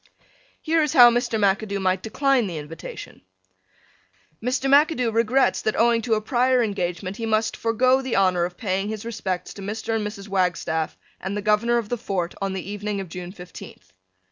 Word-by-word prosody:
Here 325 0 +2
is 300 -3 0
how 240 -2 +9
Mr. 240 -1 0
McAdoo 200 0 +1
might 185 -1 +1
decline 260 +1 +1
the 170 -3 -5
invitation: 150 +2 -9 1.2
Mr. 255 +3 -1
McAdoo 280 -4 +3
regrets 230 +4 +2
that 215 - -1
owing 235 0 +3
to 225 -1 +1
a 215 - -1
prior 250 +2 +2
engagement 185 -2 -3
he 225 - -3
must 220 0 +1
forego 255 +3 +2
the 260 -2 -2
honor 185 -3 +3
of 175 0 -4
paying 195 0 -1
his 220 0 -5
respects 195 -6 -4
to 200 - -10
Mr. 215 +3 -4
and 220 - -1
Mrs. 210 -1 -8
Wagstaff 180 -4 -1 0.2
and 190 +2 -4
the 205 - -4
Governor 215 +3 +2
of 225 -3 -3
the 245 - -2
Fort 185 -6 -2
on 195 -1 -1
the 190 -1 -5
evening 205 0 -3
of 190 -3 -6
June 180 +1 -7
fifteenth. 180 -2 -12
210 Hz, 185 wpm, -23 LUFS, 190-235 Hz, 1.2 s, how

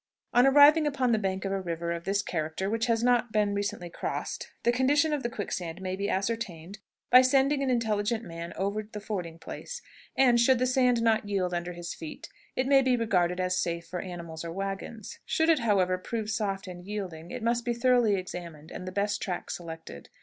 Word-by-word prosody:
On 245 +2 +6
arriving 295 +3 +7
upon 265 -4 +1
the 220 - +3
bank 190 -1 -2
of 195 - -1
a 195 0 -1
river 170 -1 -3
of 170 0 -4
this 200 +1 +1
character 160 +4 -2
which 225 +2 0
has 230 -1 +1
not 245 -1 +3
recently 205 -4 0
been - - -24
crossed, - - -4
the 240 - +4
condition 285 +5 +3
of 295 - -1
the 235 - -2
quicksand 180 -6 -4
may 185 0 -3
be 200 +1 -2
ascertained 195 -3 -3 0.3
by 250 - +10
sending 275 +2 +3
an 270 - 0
intelligent 225 -2 0
man 170 -2 -7
over 200 +2 -1
the 210 0 -8
fording 180 -6 -5
place, - - -7 0.4
and, 245 -3 +5
should 255 +2 +5
the 255 - +1
sand 250 -2 +3
not 220 -2 +2
yield 185 -3 0
under 175 0 -3
his 175 0 -6
feet, 160 - -8 0.3
it 260 - +1
may 270 0 +5
be 260 -1 +2
regarded 180 -6 +1
as 185 0 +1
safe 170 0 -2
for 180 - -5
animals 170 -3 -7
or 165 - -5
wagons. 195 +3 -5
Should 320 +1 +1
it, 320 -3 +5
however, 190 -5 +2
prove 220 +2 -3
soft 200 -4 -2
and 180 -1 -9
yielding, 180 -5 -6
it 240 +5 -6
must 235 +1 +1
be 240 0 -1
thoroughly 240 -3 +3
examined, 170 -4 -7
and 185 - -7
the - - -4
best 205 +1 -1
track 180 -3 -3
selected. 160 - -8
205 Hz, 210 wpm, -28 LUFS, 180-240 Hz, 0.4 s, by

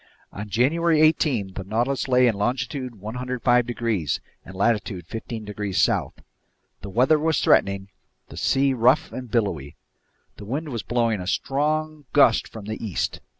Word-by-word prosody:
On 105 +1 -7
January 155 - +2
18 145 - +2
the 95 - -5
Nautilus 120 +9 -1
lay 125 -1 +4
in 120 - +3
longitude 120 +4 -2
105 125 +2 0
degrees 115 - -1 0.2
and 95 - -11
latitude 100 -4 0
15 110 +2 -6
degrees 105 -2 -3
south. - - 0 0.6
The 100 - -7
weather 130 +9 +3
was 160 0 +1
threatening, 100 0 +2 0.4
the - - -11
sea 135 0 +2
rough 125 +4 +3
and 125 -2 -7
billowy. 95 - -1 0.6
The 105 - -9
wind 145 +8 -3
was 120 -5 -3
blowing 115 -3 0
a 90 - -7
strong 155 +5 -1
gust 125 -6 +5
from 110 -3 -10
the 110 +2 -5
east. 100 -7 -2
120 Hz, 150 wpm, -24 LUFS, 105-135 Hz, 0.6 s, gust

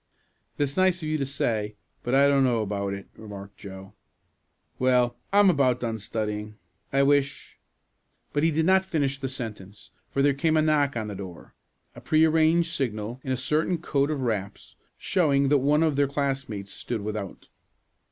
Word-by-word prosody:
"That's 140 -1 -1
nice 185 -2 +2
of - - -3
you 155 0 -1
to 135 - -1
say, 110 -6 -1 0.3
but 120 +2 0
I 140 +1 +6
don't 140 -1 +4
know 120 -4 +2
about 100 -1 -2
it," 100 - -10
remarked 100 -2 -10
Joe. 95 -1 -10 0.9
"Well, 125 -1 +3 0.2
I'm 205 0 +6
about 135 -8 +3
done 115 -2 -3
studying. 105 0 -4 0.3
I 135 0 +3
wish 140 0 0 0.3
" - - -45
But 145 - +1
he 165 - +4
did 160 0 +1
not 190 +1 +4
finish 145 -7 -1
the 135 -1 -3
sentence, 105 -6 -8 0.2
for 140 - 0
there 145 0 +4
came 155 +3 +1
a - - +4
knock 145 -4 +2
on 110 -2 -3
the - - -5
door 95 -3 -9 0.4
a - - -12
pre 155 +1 +4
arranged 160 +1 +3
signal 120 -2 -3
in 130 - -3
a 130 - 0
certain 155 +7 +1
code 145 -3 0
of 145 -4 -2
raps, 105 -5 -4 0.2
showing 140 -7 +2
that 145 -1 +4
one 150 +4 +3
of 155 -3 +1
their 140 0 +3
classmates 135 -8 -3
stood 115 -3 -4
without. 105 -2 -6
135 Hz, 180 wpm, -26 LUFS, 110-150 Hz, 0.9 s, I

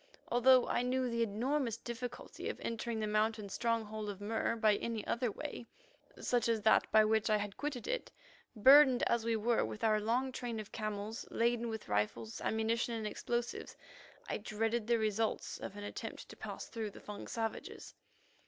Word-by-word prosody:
Although 250 +1 +6
I - - +1
knew 255 +1 +1
the 235 0 0
enormous 230 +3 0
difficulty 235 +1 -6
of - - -5
entering 230 0 -3
the 215 - 0
mountain 215 0 0
stronghold 220 -1 -1
of 200 -2 -6
Mur 220 +2 -1
by 215 -2 +3
any 230 -2 -3
other 240 -1 0
way, 260 0 -6 0.5
such 240 -2 +1
as 225 -2 +1
that 220 - +4
by 215 0 +7
which 220 0 +2
I 215 - +4
had 205 -1 -4
quitted 290 - -4
it, - - -2 0.4
burdened 265 +3 +7
as 235 -1 +1
we 230 -1 +2
were 230 +2 +2
with 215 - -5
our 215 -1 +3
long 245 +5 +1
train 240 -3 -4
of 215 - -8
camels 215 +1 -4
laden 235 0 +1
with 220 -1 -5
rifles, 105 +2 -1
ammunition, 230 +2 0
and 220 -1 -3
explosives, 240 +3 -3 0.5
I - - -1
dreaded 225 +1 -1
the 235 0 +4
results 220 0 -1
of - - -6
an 205 - -7
attempt 205 - -6
to - - -10
pass - - -6
through 225 -3 -4
the - - -12
Fung 210 -1 -8
savages. 225 -1 -4
225 Hz, 180 wpm, -34 LUFS, 215-240 Hz, 0.5 s, by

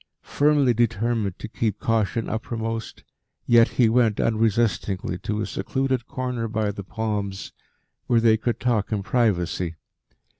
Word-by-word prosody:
Firmly 145 -3 +3
determined 115 -3 0
to - - -7
keep 110 -1 -2
caution 115 0 0
uppermost, 115 0 -4 0.4
yet 115 -1 +6
he 120 - +2
went 115 -2 +2
unresistingly 110 -5 0
to 105 +3 -3
a - - -1
secluded 130 -2 -2
corner 125 -3 -3
by 110 -2 -1
the 100 0 -7
palms 100 -1 -4 0.5
where 120 - +4
they 115 -1 +5
could 115 +2 -2
talk 120 -2 0
in 105 -2 -1
privacy. 90 -7 0
110 Hz, 135 wpm, -24 LUFS, 105-120 Hz, 0.5 s, yet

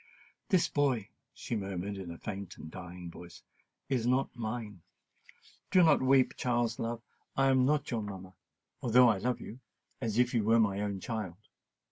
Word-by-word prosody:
"This 185 -5 +4
boy," 130 -8 +1 0.2
she 120 - -5
murmured 100 -1 -3
in 95 -3 -7
a 85 - -7
faint 100 -2 -6
and 80 - -9
dying 90 -1 -8
voice, 85 0 -12 0.4
"is 125 -3 0
not 130 +2 +1
mine. 110 -5 -5 0.9
Do 185 - +6
not 160 -3 +5
weep, 130 0 +4
Charles, 120 -2 0
love—I 120 +3 -2
am 130 -1 +4
not 150 0 +1
your 115 -2 0
mamma——although 105 +5 0
I 105 -4 +2
love 125 +3 -1
you——as 115 -1 -7
if 125 +1 +3
you 115 -3 +2
was 115 +2 +4
my 100 -2 +2
own 100 -2 -3
child. 105 -6 -4
115 Hz, 155 wpm, -31 LUFS, 95-125 Hz, 0.9 s, Do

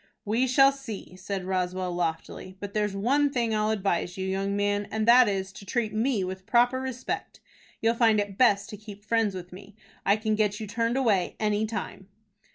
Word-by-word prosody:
"We 230 +5 +1
shall 270 +2 +6
see," 240 -9 -8
said 190 0 -5
Roswell, 185 -1 -1
loftily. 175 +2 -4
"But 200 0 -7
there's 210 -2 0
one 275 +8 +2
thing 235 -4 -1
I'll 215 0 +1
advise 195 -4 -1
you, 190 - -3
young 195 +1 -1
man, 205 0 0
and 220 0 -2
that 245 +1 +7
is, 190 -1 -2
to 200 - -11
treat 215 +1 -2
me 220 -1 +1
with 185 +1 -6
proper 245 +2 +3
respect. 260 -1 -5 0.4
You'll 225 +1 +4
find 225 -2 +3
it 205 -1 -3
best 205 -4 +3
to 210 - -7
keep 205 -1 -11
friends 225 -4 +1
with 180 -1 -8
me. 200 +2 -12 0.3
I 200 - +4
can 215 0 -1
get 210 -1 0
you 220 - -4
turned 230 +4 -1
away 215 -9 +1
any 210 0 +1
time." 210 -3 -6
210 Hz, 195 wpm, -27 LUFS, 195-230 Hz, 0.4 s, that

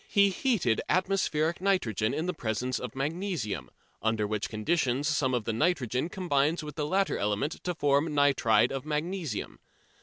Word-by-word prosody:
He 200 -1 +4
heated 185 - +1
atmospheric 180 -3 +1
nitrogen 120 - +1
in 160 - -2
the 180 - -1
presence 125 -2 -2
of - - -6
magnesium, 135 - -3 0.3
under 110 -1 +1
which 105 0 -2
conditions 130 +4 0
some 145 -4 +1
of 120 - -1
the 115 - -1
nitrogen 130 +1 0
combines 160 -3 0
with 150 -1 -7
the 150 -2 -2
latter 195 +4 +1
element 105 +10 -1
to 180 -1 -2
form 145 +1 +2
nitride 125 -6 +4
of 135 -1 -3
magnesium. 155 - -3
145 Hz, 155 wpm, -29 LUFS, 115-175 Hz, 0.3 s, He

